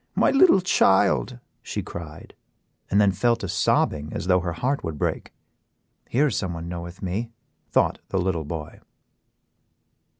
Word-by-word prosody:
"My - - +3
little 275 - +6
child," 105 - +3 0.2
she - - -4
cried, 80 -3 -9 0.6
and 100 - +3
then 100 -1 +5
fell 120 +6 +2
to 100 - -6
sobbing 75 -5 +1
as - - -4
though 90 0 +4
her 85 -1 -3
heart 130 - -1
would 80 -3 -4
break. - - -2 0.8
"Here 140 +5 +3
is 135 - 0
someone 85 -3 -3
knoweth 85 +2 -7
me," 100 +6 -2 0.4
thought - - +2
the 95 - -1
little 90 -3 0
boy. 75 0 -7
95 Hz, 145 wpm, -24 LUFS, 85-115 Hz, 0.8 s, little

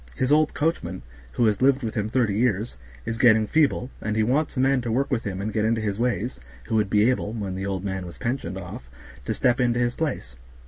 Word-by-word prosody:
His 130 +2 0
old 155 0 +3
coachman, 160 - -1 0.3
who 120 - +2
has 105 0 +1
lived 135 0 +3
with 110 - -3
him 105 -1 -2
thirty 115 -3 +1
years, 110 0 0 0.3
is 115 0 -3
getting 110 -3 +5
feeble, 140 -1 +1
and 110 0 -2
he 110 - +2
wants 135 +6 0
a - - +1
man 135 0 +3
to 120 -1 -3
work 135 +4 0
with 115 - -1
him 95 -2 -3
and 105 +2 -3
get 105 - +1
into 115 +1 +1
his 105 -1 -2
ways, 120 - -1 0.2
who 110 - -3
would 105 -2 +1
be 105 +2 +4
able, 110 -4 -2
when 100 -5 -4
the 95 +1 -4
old 95 -1 -3
man 95 -2 -3
was 85 - -10
pensioned 115 -7 -3
off, 85 -9 -8 0.4
to - - -1
step 120 -1 +2
into 120 -1 +2
his 120 0 +1
place. 125 - -3
115 Hz, 240 wpm, -24 LUFS, 100-125 Hz, 0.4 s, getting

